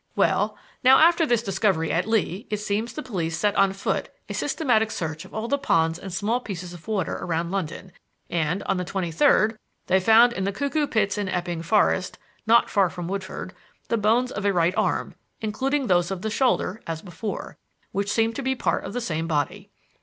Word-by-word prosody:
Well, -, -, +1 dB, 0.3 s
now, 260 Hz, +1 st, +8 dB
after 335 Hz, 0 st, +5 dB
this 235 Hz, -3 st, +2 dB
discovery 190 Hz, -5 st, +1 dB
at 180 Hz, +4 st, 0 dB
Lee 215 Hz, -3 st, 0 dB
it 210 Hz, -, -1 dB
seems 210 Hz, +3 st, -2 dB
that 305 Hz, -, -5 dB
the -, -, -15 dB
police 165 Hz, -4 st, -1 dB
set 205 Hz, +4 st, +1 dB
on 195 Hz, -1 st, +4 dB
foot 195 Hz, +1 st, -2 dB, 0.2 s
a -, -, -3 dB
systematic 225 Hz, -8 st, +1 dB
search 160 Hz, -5 st, -4 dB
of -, -, -13 dB
all 220 Hz, +1 st, -2 dB
the 280 Hz, +3 st, 0 dB
ponds 165 Hz, -7 st, +1 dB
and 195 Hz, -, -7 dB
small 210 Hz, +7 st, 0 dB
pieces 180 Hz, -6 st, -7 dB
of 175 Hz, +2 st, -13 dB
water 205 Hz, -5 st, -1 dB
around 170 Hz, 0 st, -2 dB
London, 190 Hz, -1 st, -4 dB, 0.4 s
and, 165 Hz, +3 st, -1 dB
on -, -, 0 dB
the 180 Hz, -, -1 dB
twenty 180 Hz, -1 st, -3 dB
third, 215 Hz, +7 st, +3 dB, 0.3 s
they 190 Hz, -, +3 dB
found 225 Hz, +5 st, +6 dB
in 190 Hz, -, -3 dB
the 200 Hz, -, 0 dB
Cuckoo 280 Hz, +7 st, -1 dB
Pits 210 Hz, -3 st, 0 dB
in 200 Hz, -2 st, -2 dB
Epping 175 Hz, -2 st, -2 dB
Forest, 185 Hz, +1 st, +1 dB, 0.3 s
not 235 Hz, +1 st, +5 dB
far 195 Hz, -3 st, +2 dB
from 175 Hz, 0 st, -6 dB
Woodford, 190 Hz, 0 st, -5 dB, 0.4 s
the -, -, +2 dB
bones 230 Hz, +4 st, +2 dB
of 205 Hz, -, -4 dB
a 200 Hz, -, +3 dB
right 175 Hz, -1 st, +2 dB
arm -, -, 0 dB, 0.3 s
(including 265 Hz, +6 st, -1 dB
those 175 Hz, -4 st, +2 dB
of 190 Hz, -2 st, -4 dB
the 220 Hz, -, -2 dB
shoulder, 225 Hz, -4 st, +1 dB
as 165 Hz, -1 st, -4 dB
before), 200 Hz, +3 st, -6 dB, 0.3 s
which 200 Hz, +1 st, -1 dB
seem 225 Hz, +1 st, +2 dB
to 275 Hz, -, -4 dB
be 265 Hz, 0 st, 0 dB
part -, -, 0 dB
of 195 Hz, -, -6 dB
the 245 Hz, -, -2 dB
same 165 Hz, -7 st, -2 dB
body." 150 Hz, -4 st, -2 dB
200 Hz, 205 wpm, -24 LUFS, 175-225 Hz, 0.4 s, now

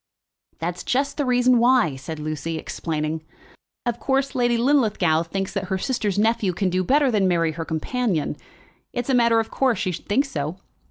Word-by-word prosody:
"That's 175 Hz, +2 st, -4 dB
just 275 Hz, +2 st, 0 dB
the 290 Hz, -3 st, 0 dB
reason 250 Hz, 0 st, +4 dB
why," 240 Hz, -, +4 dB
said 145 Hz, +4 st, -7 dB
Lucy, 155 Hz, +2 st, -4 dB
explaining. 155 Hz, -1 st, -3 dB, 0.6 s
"Of 240 Hz, -1 st, -1 dB
course, 270 Hz, 0 st, 0 dB
Lady 240 Hz, -2 st, +2 dB
Linlithgow 220 Hz, -, +2 dB
thinks 190 Hz, +3 st, -4 dB
that 195 Hz, -1 st, -2 dB
her 190 Hz, +1 st, -1 dB
sister's 210 Hz, -3 st, -1 dB
nephew 215 Hz, -3 st, +2 dB
can 185 Hz, +1 st, 0 dB
do 185 Hz, +1 st, +1 dB
better 275 Hz, +5 st, +3 dB
than 200 Hz, -4 st, +2 dB
marry 165 Hz, -3 st, +2 dB
her 165 Hz, +1 st, -5 dB
companion. 170 Hz, -, -1 dB, 0.6 s
It's 245 Hz, +1 st, -2 dB
a -, -, +2 dB
matter 235 Hz, -2 st, +4 dB
of 225 Hz, -, -3 dB
course 260 Hz, -4 st, +1 dB
she 185 Hz, -, -1 dB
should 170 Hz, -, -8 dB
think 260 Hz, +8 st, +2 dB
so. 155 Hz, -, -4 dB
205 Hz, 180 wpm, -23 LUFS, 165-250 Hz, 0.6 s, reason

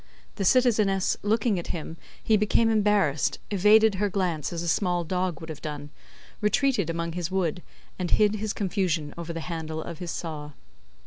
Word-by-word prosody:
The 195 Hz, -, -1 dB
citizeness 215 Hz, -6 st, +3 dB
looking 210 Hz, -1 st, +1 dB
at 170 Hz, -, -7 dB
him, 160 Hz, -1 st, -5 dB, 0.3 s
he 220 Hz, -, +3 dB
became 215 Hz, +2 st, +3 dB
embarrassed, 205 Hz, -, +2 dB
evaded 210 Hz, +2 st, +5 dB
her 205 Hz, -, +2 dB
glance 180 Hz, -7 st, -1 dB
as 170 Hz, -1 st, -3 dB
a -, -, -4 dB
small 175 Hz, +1 st, +1 dB
dog 180 Hz, -1 st, -2 dB
would 160 Hz, -, -9 dB
have 155 Hz, -, -7 dB
done, 145 Hz, -1 st, -6 dB, 0.5 s
retreated 210 Hz, -, +2 dB
among 170 Hz, 0 st, -2 dB
his 175 Hz, 0 st, -3 dB
wood, 180 Hz, -3 st, -1 dB, 0.4 s
and 180 Hz, -1 st, -2 dB
hid 215 Hz, 0 st, +3 dB
his 215 Hz, 0 st, -2 dB
confusion 180 Hz, -7 st, -1 dB
over 170 Hz, 0 st, -6 dB
the 165 Hz, 0 st, -4 dB
handle 160 Hz, -2 st, -5 dB
of 160 Hz, 0 st, -7 dB
his 175 Hz, -, -5 dB
saw. 150 Hz, -4 st, -5 dB
180 Hz, 175 wpm, -26 LUFS, 165-210 Hz, 0.5 s, evaded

